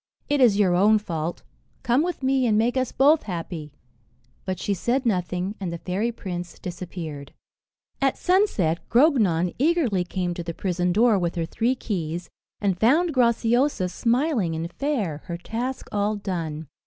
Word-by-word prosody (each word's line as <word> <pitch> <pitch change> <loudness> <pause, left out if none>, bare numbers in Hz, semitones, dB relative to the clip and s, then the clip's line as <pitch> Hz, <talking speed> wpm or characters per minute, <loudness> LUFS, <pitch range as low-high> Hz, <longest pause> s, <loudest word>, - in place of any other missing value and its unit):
"It 290 -1 +2
is 225 -6 +5
your 195 -4 +3
own 205 +5 +5
fault. 170 -5 -4 0.4
Come 245 +4 +3
with 345 -4 -3
me, 260 -1 +2
and 215 -2 +3
make 235 +3 +2
us 260 -1 0
both 295 +4 +4
happy." 165 -5 -6 0.7
But 185 -1 -2
she 200 - -1
said 245 +7 0
nothing, 180 -2 -1
and 185 -4 -3
the 170 - -4
fairy 195 +7 -2
prince 180 -5 -6
disappeared. 170 -5 -7 0.7
At 270 -1 +2
sunset, 355 - +2
Grognon 215 - +3
eagerly 275 - +2
came 180 0 -2
to 175 - -5
the 170 -1 -5
prison 180 -1 -1
door 215 +1 +4
with 175 -1 -1
her 165 -1 -1
three 235 +9 0
keys, 175 -7 -4 0.3
and 195 -3 0
found 310 +9 +3
Graciosa 235 -3 +2
smiling 235 - 0
and 165 +2 -4
fair, 215 - -2
her 170 - -4
task 240 +8 -4
all 205 +1 0
done. 165 -6 -4
200 Hz, 160 wpm, -24 LUFS, 175-250 Hz, 0.7 s, is